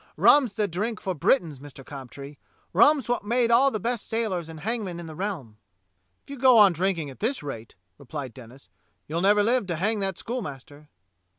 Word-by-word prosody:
Rum's 265 -8 +5
the 210 0 0
drink 210 +6 -3
for 190 - -3
Britons, 155 - +1
Mister 140 -1 -11
Cobtree. 140 +1 -10 0.4
Rum's 270 - +4
wot's 245 -2 -1
made 235 +2 +1
all 260 +4 +5
the 215 - -3
best 235 +2 -3
sailors 200 -8 -2
and 160 -1 -9
hangmen 205 -4 -3
in 170 - -7
the 160 - -8
realm." 155 - -5 0.7
"If - - -14
you 280 - -7
go 255 -2 +6
on 205 -4 +7
drinking 170 -4 -1
at 130 - -15
this 240 - -1
rate," 115 -6 -7 0.2
replied 140 -2 -7
Denis, 130 +1 -14 0.4
"you'll 165 +3 -2
never 205 +2 +4
live 235 -1 +1
to 175 - -2
hang 210 +6 0
that 195 -2 -2
schoolmaster." 150 - -7
190 Hz, 190 wpm, -25 LUFS, 145-230 Hz, 0.7 s, on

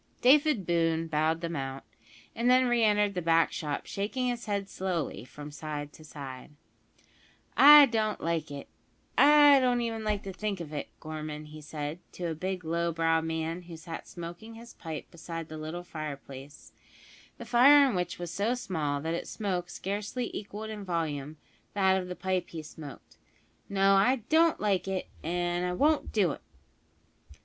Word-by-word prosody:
David 280 - +4
Boone 165 -1 +1
bowed 160 +1 0
them 170 -1 -3
out, 135 -1 -4 0.5
and 235 +2 +1
then 255 +1 +5
re 240 -2 +2
entered 210 -1 +3
the 180 - -2
back 165 0 +3
shop, 150 -2 -4
shaking 245 +6 -2
his 240 -1 -4
head 200 -1 -1
slowly 180 - -3
from 145 +3 -10
side 150 -1 -6
to 155 - -14
side. 140 -2 -9 1.0
"I 295 0 +10
don't 220 -4 -1
like 165 -2 -2
it 140 -1 -8 0.5
I 290 -1 +7
don't 250 -2 +2
even 225 -1 -3
like 210 -2 -1
to 195 - -6
think 205 0 -3
of 155 -3 -7
it, 145 - -4
Gorman," 155 -1 -6
he 155 0 -11
said 150 +1 -5
to 180 - -5
a - - -1
big 180 +2 -4
low 170 +1 0
browed 165 0 +1
man 160 +1 -3
who 170 -2 -10
sat 165 +1 -8
smoking 175 +6 -9
his 235 +1 -12
pipe 160 -3 -7
beside 165 -1 -7
the 155 - -7
little 160 +3 -5
fireplace, 145 -4 -8 0.6
the 235 - -8
fire 275 +5 +7
in 255 - -1
which 180 -1 -2
was 175 -1 -5
so 215 +7 0
small 155 - -2
that 160 +2 -2
its 170 - -4
smoke 180 -4 -3
scarcely 205 +7 -4
equalled 210 +1 -6
in 210 -2 -6
volume 155 -5 -3 0.4
that 190 -1 +3
of 180 - -7
the 180 - -5
pipe 185 -1 -2
he 160 -2 -7
smoked: 150 -2 -11 0.5
"No, 195 0 +4
I 225 +5 +3
don't 325 +1 +4
like 195 -3 0
it, 190 -1 -3
and 175 +1 -1
I 180 0 -1
won't 295 +9 +2
do 195 -7 +2
it." - - -8
175 Hz, 175 wpm, -29 LUFS, 160-215 Hz, 1.0 s, I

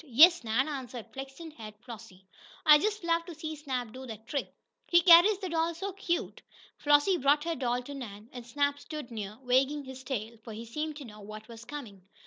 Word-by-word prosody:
"Yes, 315 +4 +6
Nan," 230 +5 +1
answered 250 -6 -6
flaxen 270 +5 -8
haired 215 -7 -10
Flossie. 225 -6 -11 0.4
"I 300 -1 +9
just 425 +2 -1
love 335 0 +1
to 345 - -8
see 315 0 -5
Snap 260 -6 -4
do 260 0 -8
that 220 -1 -9
trick! 280 +3 -3 0.4
He 345 0 +5
carries 350 +4 +8
the 380 -2 -5
doll 330 0 0
so 395 +4 -4
cute!" 345 -3 -2 0.4
Flossie 290 +6 +4
brought 285 +1 +3
her 335 0 -1
doll 250 -2 -1
to 285 - -8
Nan, 220 -6 -8
and 245 -1 -7
Snap 285 +4 0
stood 300 -6 -7
near, 210 -2 -6
wagging 265 +4 +2
his 260 -1 -9
tail, 230 -3 -4
for 220 - -8
he 225 +2 -7
seemed 300 +6 -4
to 290 - -8
know 215 -2 -12
what 215 +1 -10
was 230 -1 -11
coming. 235 -10 -8
270 Hz, 205 wpm, -30 LUFS, 230-315 Hz, 0.4 s, I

